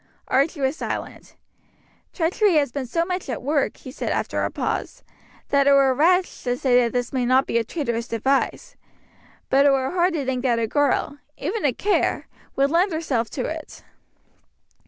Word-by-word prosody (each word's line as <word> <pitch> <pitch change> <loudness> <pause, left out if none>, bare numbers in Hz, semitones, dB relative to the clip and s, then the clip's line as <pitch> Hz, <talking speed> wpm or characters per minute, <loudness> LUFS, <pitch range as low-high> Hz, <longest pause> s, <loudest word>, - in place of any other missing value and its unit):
Archie 280 +2 +1
was 265 +2 +1
silent. - - -6 0.8
"Treachery 365 +2 +1
has 285 -4 +2
been 265 -1 -4
so 335 +7 0
much 360 -4 -4
at 245 - -4
work," 285 +1 0
he 260 - -10
said - - -4
after - - -1
a - - 0
pause, - - -4 0.5
"that 280 0 +3
it 280 - +6
were 275 -1 +5
rash 360 +7 +2
to 245 -1 -1
say 255 -1 +2
that 235 -1 0
this 245 +1 -2
may 255 -2 0
not 255 +2 +3
be 235 - 0
a - - -1
traitorous 235 -3 -3
device; 265 +5 -1 0.8
but 275 +2 +5
it - - +5
were 265 -1 0
hard 355 0 +2
to 295 -5 -2
think 255 -1 -1
that 245 -3 +1
a 230 - +1
girl 290 +3 0 0.2
even 425 +1 -3
a 285 - +3
Kerr 400 - 0 0.3
would 275 +1 +2
lend 360 +4 +2
herself 275 -9 -1
to 255 - -4
it." 315 -1 -7
275 Hz, 185 wpm, -23 LUFS, 255-320 Hz, 0.8 s, it